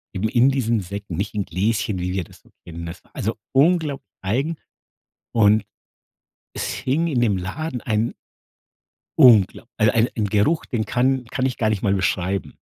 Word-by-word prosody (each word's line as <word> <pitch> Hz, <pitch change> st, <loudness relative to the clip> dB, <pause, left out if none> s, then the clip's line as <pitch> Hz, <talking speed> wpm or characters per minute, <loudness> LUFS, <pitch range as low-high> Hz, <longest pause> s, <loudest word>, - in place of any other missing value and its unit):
eben 95 Hz, +3 st, 0 dB
in 125 Hz, +4 st, +4 dB
diesen 115 Hz, -5 st, +1 dB
Säcken, 100 Hz, -1 st, -6 dB
nicht 100 Hz, +5 st, -3 dB
in 100 Hz, -2 st, -1 dB
Gläschen, 100 Hz, +2 st, -1 dB
wie 90 Hz, +1 st, -2 dB
wir 95 Hz, -2 st, -1 dB
das -, -, -17 dB
so -, -, -24 dB, 0.2 s
kennen. 85 Hz, 0 st, -7 dB
Das 85 Hz, +2 st, -9 dB
war -, -, -28 dB
also -, -, -2 dB, 0.2 s
unglaublich 150 Hz, -1 st, +2 dB, 0.2 s
eigen 135 Hz, +12 st, 0 dB, 0.8 s
und 110 Hz, -1 st, +4 dB, 0.9 s
es -, -, -2 dB
hing 155 Hz, +6 st, 0 dB
in 135 Hz, -7 st, 0 dB
dem 105 Hz, -5 st, +2 dB
Laden 125 Hz, -, -4 dB
ein 110 Hz, +1 st, 0 dB, 1.1 s
unglaub 115 Hz, -5 st, +6 dB
also 110 Hz, -2 st, +4 dB
ein 115 Hz, +2 st, +2 dB
ein 110 Hz, -, +1 dB
Geruch, 105 Hz, +11 st, +1 dB
den 115 Hz, -4 st, -2 dB
kann 130 Hz, +1 st, +1 dB
kann 130 Hz, +2 st, -2 dB
ich 130 Hz, -, -1 dB
gar 110 Hz, -, +1 dB
nicht 105 Hz, -3 st, -1 dB
mal 100 Hz, -, +2 dB
beschreiben. 95 Hz, 0 st, -1 dB
110 Hz, 175 wpm, -22 LUFS, 100-130 Hz, 1.1 s, unglaub